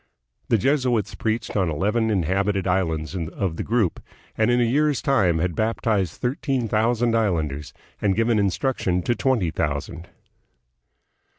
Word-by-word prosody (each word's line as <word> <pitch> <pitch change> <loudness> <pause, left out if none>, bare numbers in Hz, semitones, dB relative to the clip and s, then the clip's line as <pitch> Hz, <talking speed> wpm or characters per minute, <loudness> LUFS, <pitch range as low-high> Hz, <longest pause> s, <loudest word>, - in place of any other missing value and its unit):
The 115 - +4
Jesuits 125 -4 +1
preached 110 +4 -2
on 95 -4 +1
eleven 105 +8 0
inhabited 95 +1 0
islands 85 -3 -1
of 85 0 -3
the - - -2
group, 110 -6 0 0.3
and 110 +1 +2
in 120 0 +3
a - - +4
year's 145 +3 +2
time 100 -12 +2
had 85 +2 0
baptized 110 -4 0
thirteen 130 -2 -1
thousand 115 +2 +1
islanders 80 -10 -1 0.3
and 100 -2 +2
given 115 -1 +2
instruc 105 +7 0
tion 90 -1 0
to 120 - +1
twenty 120 - +1
thousand. 75 +2 -3
105 Hz, 140 wpm, -23 LUFS, 90-120 Hz, 0.3 s, The